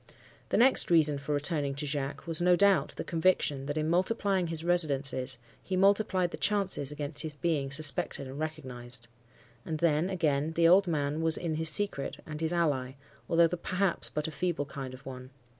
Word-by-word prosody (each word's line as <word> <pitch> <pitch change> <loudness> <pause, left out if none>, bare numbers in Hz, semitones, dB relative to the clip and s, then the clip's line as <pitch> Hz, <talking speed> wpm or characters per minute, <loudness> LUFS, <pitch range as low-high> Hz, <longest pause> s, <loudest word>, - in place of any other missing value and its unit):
The - - +1
next 260 +3 +5
reason 155 -4 +3
for 140 +2 -6
returning 145 -1 +2
to 145 +2 -4
Jacques 140 -1 -3
was, 165 0 0
no 180 0 +4
doubt, 200 0 +3
the - - -3
conviction 160 -5 0
that, 145 +1 -3
in 155 0 -1
multiplying 185 +1 0
his 165 -1 0
residences, 140 -7 0 0.2
he 185 - -3
multiplied 195 -2 +2
the - - -6
chances 195 -9 0
against 145 0 -4
his 155 -2 -5
being 145 -3 -1
suspected 145 -1 0
and 135 +2 -8
recognized. 125 -6 -5 0.6
And 160 - -4
then, 160 +2 +1
again, 160 -4 0
the 165 0 +3
old 190 +3 +5
man 150 -1 -1
was 160 -1 +3
in 170 -2 -3
his 160 +1 +2
secret, 160 -4 -2
and 155 0 -7
his 160 0 -1
ally, 145 -7 0 0.4
although 170 0 +4
perhaps 180 +2 -1
but 150 0 -3
a - - -5
feeble 170 -2 -2
kind 135 -2 -7
of 130 - -17
one. 130 -1 -9
155 Hz, 185 wpm, -29 LUFS, 140-175 Hz, 0.6 s, next